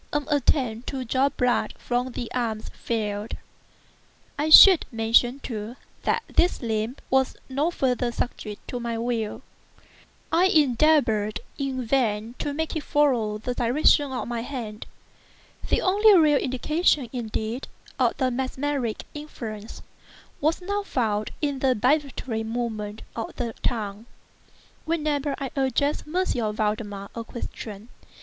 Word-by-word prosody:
An 295 Hz, -1 st, -1 dB
attempt 255 Hz, -4 st, +1 dB
to 265 Hz, -2 st, -4 dB
draw 260 Hz, +4 st, +2 dB
blood 250 Hz, -3 st, 0 dB
from 245 Hz, +1 st, -2 dB
the 235 Hz, -, -5 dB
arm 230 Hz, -3 st, -1 dB
failed. 210 Hz, -2 st, -4 dB, 1.0 s
I 300 Hz, +2 st, -1 dB
should 365 Hz, +2 st, +10 dB
mention, 230 Hz, +3 st, +3 dB
too, 220 Hz, 0 st, -5 dB, 0.3 s
that 460 Hz, -, +1 dB
this 355 Hz, -, +2 dB
limb 220 Hz, +1 st, -1 dB, 0.2 s
was 265 Hz, 0 st, +2 dB
no 285 Hz, +5 st, +1 dB
farther 250 Hz, -6 st, 0 dB
subject 215 Hz, -3 st, -5 dB
to 245 Hz, -, -3 dB
my 235 Hz, -1 st, -3 dB
will. 230 Hz, -2 st, -2 dB, 0.9 s
I 340 Hz, +3 st, +4 dB
endeavored 270 Hz, -, +3 dB, 0.2 s
in 265 Hz, -3 st, -2 dB
vain 225 Hz, -3 st, 0 dB
to 290 Hz, -, -2 dB
make 320 Hz, +3 st, -3 dB
it 315 Hz, -, -1 dB
follow 250 Hz, -9 st, +1 dB
the 250 Hz, +4 st, -3 dB
direction 265 Hz, +4 st, +3 dB
of 255 Hz, -, -3 dB
my 235 Hz, -1 st, -3 dB
hand. 230 Hz, -5 st, -6 dB, 0.8 s
The -, -, +2 dB
only 410 Hz, +2 st, +6 dB
real 300 Hz, -3 st, +5 dB
indication, 285 Hz, +2 st, +1 dB
indeed, 230 Hz, 0 st, -3 dB, 0.3 s
of -, -, +2 dB
the 260 Hz, -2 st, +1 dB
mesmeric 260 Hz, -1 st, -2 dB
influence, 230 Hz, -8 st, -8 dB, 0.6 s
was 320 Hz, +5 st, 0 dB
now 405 Hz, +2 st, -1 dB
found 220 Hz, -, -1 dB
in 285 Hz, -2 st, 0 dB
the 260 Hz, -1 st, +2 dB
vibratory 255 Hz, -2 st, 0 dB
movement 220 Hz, -2 st, -4 dB
of 225 Hz, -, -5 dB
the 235 Hz, -2 st, -3 dB
tongue, 215 Hz, -1 st, -3 dB, 0.8 s
whenever 300 Hz, -3 st, -1 dB
I 270 Hz, -2 st, -4 dB
addressed 275 Hz, +2 st, 0 dB
M. 275 Hz, -, -1 dB
Valdemar 210 Hz, -2 st, -2 dB
a 230 Hz, -, -5 dB
question. 225 Hz, -2 st, -8 dB
250 Hz, 130 wpm, -25 LUFS, 225-285 Hz, 1.0 s, should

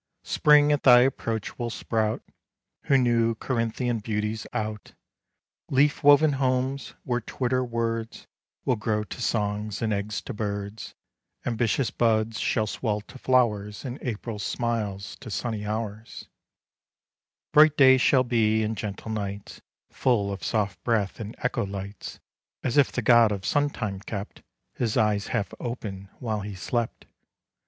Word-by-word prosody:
Spring 150 Hz, 0 st, +5 dB
at 145 Hz, -, +2 dB
thy 125 Hz, -2 st, +8 dB
approach 115 Hz, -4 st, -1 dB
will 120 Hz, -1 st, -2 dB
sprout 110 Hz, -1 st, -1 dB, 0.6 s
Her 135 Hz, -, +4 dB
new 115 Hz, -2 st, +2 dB
Corinthian 115 Hz, 0 st, -1 dB
beauties 105 Hz, 0 st, -3 dB
out, 105 Hz, -1 st, -4 dB, 0.8 s
Leaf 140 Hz, +2 st, +2 dB
woven 145 Hz, +1 st, +7 dB
homes, 130 Hz, 0 st, -1 dB
where 120 Hz, -1 st, -1 dB
twitter 130 Hz, +2 st, -1 dB
words 115 Hz, -1 st, -3 dB, 0.4 s
Will 125 Hz, -, +2 dB
grow 105 Hz, 0 st, -1 dB
to 115 Hz, -, -8 dB
songs, 105 Hz, -2 st, -1 dB
and 110 Hz, -2 st, 0 dB
eggs 105 Hz, +1 st, -2 dB
to -, -, -6 dB
birds; 100 Hz, 0 st, -5 dB, 0.5 s
Ambitious 120 Hz, +1 st, 0 dB
buds 110 Hz, -2 st, +1 dB
shall 110 Hz, -3 st, +1 dB
swell 105 Hz, -1 st, -2 dB
to 130 Hz, +5 st, -14 dB
flowers, 105 Hz, -6 st, +1 dB
And 125 Hz, +1 st, -5 dB
April 110 Hz, -2 st, -4 dB
smiles 100 Hz, -2 st, -3 dB
to -, -, -10 dB
sunny 105 Hz, 0 st, -3 dB
hours, 110 Hz, 0 st, -5 dB, 1.3 s
Bright 150 Hz, 0 st, +7 dB
days 130 Hz, -2 st, +7 dB
shall 130 Hz, -1 st, +4 dB
be, 110 Hz, -3 st, +2 dB
and 110 Hz, +1 st, -1 dB
gentle 105 Hz, +1 st, -5 dB
nights 100 Hz, -2 st, -5 dB, 0.3 s
Full 105 Hz, -6 st, +1 dB
of 100 Hz, -, -7 dB
soft 100 Hz, -5 st, -1 dB
breath 110 Hz, -4 st, 0 dB
and 110 Hz, 0 st, -6 dB
echo 125 Hz, -1 st, 0 dB
lights, 100 Hz, 0 st, -7 dB, 0.4 s
As 125 Hz, -, -1 dB
if 145 Hz, -2 st, +4 dB
the 120 Hz, -, -2 dB
god 120 Hz, -2 st, +6 dB
of 100 Hz, -2 st, -4 dB
sun 145 Hz, 0 st, +2 dB
time 105 Hz, -8 st, -4 dB
kept 100 Hz, 0 st, -7 dB, 0.3 s
His 115 Hz, -3 st, -1 dB
eyes 105 Hz, -2 st, +2 dB
half 110 Hz, -5 st, -2 dB
open 100 Hz, -5 st, -5 dB
while 110 Hz, -4 st, -2 dB
he 100 Hz, 0 st, -6 dB
slept. 115 Hz, +5 st, -3 dB
115 Hz, 145 wpm, -26 LUFS, 105-125 Hz, 1.3 s, thy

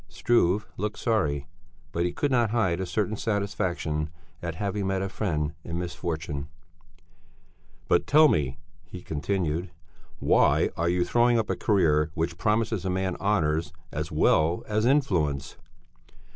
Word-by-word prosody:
Struve 105 Hz, -3 st, +2 dB
looked 105 Hz, +2 st, -3 dB
sorry, 75 Hz, -, 0 dB, 0.5 s
but 85 Hz, +1 st, 0 dB
he 90 Hz, -, 0 dB
could 145 Hz, +8 st, -1 dB
not 120 Hz, -3 st, +3 dB
hide 105 Hz, -7 st, +1 dB
a 95 Hz, -, -3 dB
certain 105 Hz, +3 st, -1 dB
satisfaction 95 Hz, -8 st, -1 dB, 0.3 s
at 85 Hz, -2 st, -4 dB
having 100 Hz, +1 st, -2 dB
met 95 Hz, 0 st, 0 dB
a 95 Hz, -, -2 dB
friend 80 Hz, -8 st, -2 dB
in 85 Hz, -, -4 dB
misfortune. 80 Hz, -5 st, -4 dB, 1.4 s
"But -, -, +2 dB
tell 155 Hz, +2 st, +7 dB
me," 70 Hz, -, 0 dB, 0.3 s
he 90 Hz, -1 st, -9 dB
continued, 85 Hz, +2 st, -2 dB, 0.5 s
"Why -, -, +3 dB
are 85 Hz, +1 st, 0 dB
you 90 Hz, 0 st, +1 dB
throwing 120 Hz, 0 st, +3 dB
up 110 Hz, -2 st, 0 dB
a -, -, 0 dB
career 80 Hz, -7 st, +2 dB
which 85 Hz, +1 st, -2 dB
promises 105 Hz, -1 st, +1 dB
a 95 Hz, -, -1 dB
man 95 Hz, 0 st, -1 dB
honours 85 Hz, -6 st, 0 dB, 0.2 s
as 75 Hz, +1 st, -4 dB
well 80 Hz, +3 st, +2 dB
as 110 Hz, +2 st, +1 dB
influence?" 80 Hz, -, +1 dB
90 Hz, 145 wpm, -27 LUFS, 80-105 Hz, 1.4 s, tell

